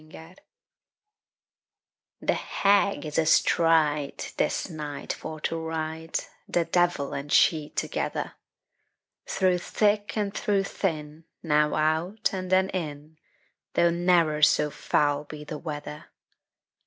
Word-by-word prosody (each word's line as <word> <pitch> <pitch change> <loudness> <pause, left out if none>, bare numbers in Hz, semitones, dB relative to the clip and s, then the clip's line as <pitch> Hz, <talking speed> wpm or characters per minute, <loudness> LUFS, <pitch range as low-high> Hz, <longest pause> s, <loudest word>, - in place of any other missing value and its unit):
THE - - -12
HAG 160 +2 -13 1.9
The - - +1
Hag 200 -2 +1
is 150 0 -1
astride, 155 -2 +2
This - - 0
night 150 -5 -5
for 155 0 -7
to 165 - -2
ride, 160 0 -3 0.3
The 170 -1 +1
devil 175 -6 +1
and 140 +1 -5
she 155 -3 +4
together; - - -3 0.9
Through 185 -2 +2
thick 205 +3 0
and 205 -2 -1
through 200 -2 +1
thin, 155 -5 -4 0.2
Now 150 -2 +2
out, 160 +9 0
and 185 -1 -4
then 190 0 +4
in, 155 -3 -6 0.6
Though 170 0 +4
ne'er 170 -3 +2
so 150 0 +4
foul 145 0 +1
be 150 0 -9
the 150 0 -6
weather. 150 -1 -7
160 Hz, 115 wpm, -26 LUFS, 150-180 Hz, 1.9 s, she